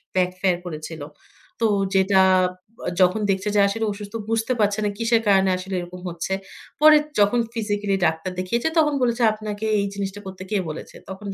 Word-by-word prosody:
Back 180 -1 +3
fair 185 -3 +2
করেছিল। 155 -1 -7 0.6
তো 230 - +2 0.3
যেটা 190 0 +4 0.8
যখন 185 +4 +3
দেখছে 190 +2 -1
যে, - - +4
আসলে 225 +3 -1
অসুস্থ, 205 +1 -8 0.2
বুঝতে 225 +2 0
পারছে 205 0 +2
না - - +1
কিসের 230 0 +2
কারণে 195 -1 +4
আসলে 190 +1 -7
এরকম 175 +1 -8
হচ্ছে। 170 +2 -4 0.5
পরে 305 0 +8 0.2
যখন 205 +4 +4
ফিজিক্যালি 205 -3 -1
ডাক্তার 160 +4 -1
দেখিয়েছে, 235 +9 -1
তখন 300 -2 +4
বলেছে, 240 -1 +1
"আপনাকে 215 0 -5
এই 200 - 0
জিনিসটা 200 0 -4
করতে 190 -1 -8
কে 210 - +2
বলেছে?" 155 - -8
তখন 190 +2 -8
200 Hz, 170 wpm, -23 LUFS, 185-220 Hz, 0.8 s, পরে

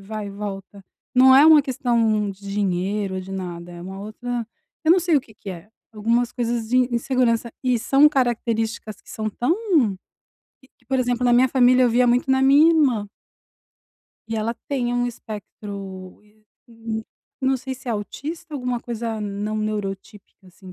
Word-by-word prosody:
vai 210 +1 -6
e - - -7
volta, 200 -1 -7 0.3
não 260 +1 +7
é 280 - +8
uma 315 -1 +8
questão 230 -6 0
de 195 - -12
dinheiro, 195 0 -1
de 185 +1 -10
nada, 175 -2 -6
é 175 0 -9
uma 190 +2 -8
outra 235 +3 -5 0.4
eu 315 - +3
não 365 - +7
sei 345 -1 +1
o - - +3
que 220 -3 -19
que 200 - -8
é, 180 +2 -9 0.2
algumas 230 +3 0
coisas 235 -2 -2
de 255 - +3 0.2
insegurança, 235 -1 +1
e 250 -2 +2
são 275 +6 +5
características 230 -5 -1
que - - -16
são 215 0 -3
tão 245 +10 0 1.1
que 265 - -23
que, 245 - -33
por 265 +1 0
exemplo, 245 0 0
na 245 - +4
minha 250 +2 +5
família, 255 0 +4
eu 245 - +4
via 245 +2 +3
muito 250 +4 +2
na 265 0 +3
minha 280 +4 +6
irmã. 265 -11 +2 1.2
E 225 0 -3
ela 225 +2 -1
tem 245 -4 -1
um 245 0 +1
espectro, 200 -4 -8
e 210 - -26
eh, 215 0 -31 0.3
nã 225 -1 -5 0.4
não 265 0 +2
sei 265 +1 -6
se 255 - -17
é - - 0
autista, 300 - -6
alguma 250 -3 -2
coisa 230 -2 -4
não 210 +1 -3
neurotípica, 205 -2 -5
assim, 185 +1 -14
230 Hz, 180 wpm, -22 LUFS, 205-250 Hz, 1.2 s, é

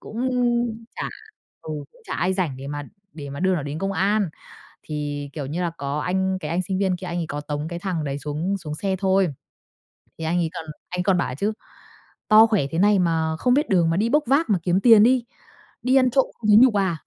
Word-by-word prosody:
cũng 225 - -7 0.8
chả - - -3 0.5
ừ, - - -8 0.2
cũng - - -23
chả - - -5
ai 185 +2 0
rảnh 170 -9 -1
để 135 - -8
mà 145 +1 -4 0.3
để 145 -3 -8
mà 140 - -6
đưa 190 0 +2
nó 155 - -2
đến 145 +2 -5
công 195 +3 -2
an. 200 0 +1 0.5
Thì, 145 -1 -4
kiểu 145 -3 -5
như 155 +6 -4
là, 170 - 0
có 140 +1 -3
anh, 190 +2 0
cái 150 -1 -5
anh 180 +2 0
sinh 190 0 -3
viên 190 -2 +1
kia, 180 - -8
anh 175 0 -3
ấy 165 - -2
có 145 0 -4
tống 150 +1 -4
cái 170 - -5
thằng 175 -4 -3
đấy 140 0 -3
xuống 155 +7 -2
xuống 150 -4 -6
xe 190 +4 -2
thôi. 190 -1 +2 0.9
Thì 160 - -7
anh 170 +2 0
ấy 165 - 0
còn 160 - -6 0.2
anh 180 0 -2
còn 185 -1 +3
bảo 175 - 0
ấy 125 - -5
chứ: 205 +9 -1 0.8
"To 215 +1 +8
khỏe 205 -11 +1
thế 165 - -1
này 205 0 +4
mà 160 -2 0
không 250 - +3
biết 295 +3 +1
đường 175 -4 +3
mà 165 - 0
đi 220 +3 +1
bốc 300 +4 +3
vác 280 +6 +2
mà 190 - +3
kiếm 180 +1 +2
tiền 225 -3 +7
đi, 245 0 +3 0.6
đi 255 +1 +2
ăn 255 -1 +4
trộm 270 +1 +3
không 215 - -3
thấy 210 - +8
nhục 250 0 +7
à?" 190 -5 +1
180 Hz, 245 wpm, -23 LUFS, 155-200 Hz, 0.9 s, To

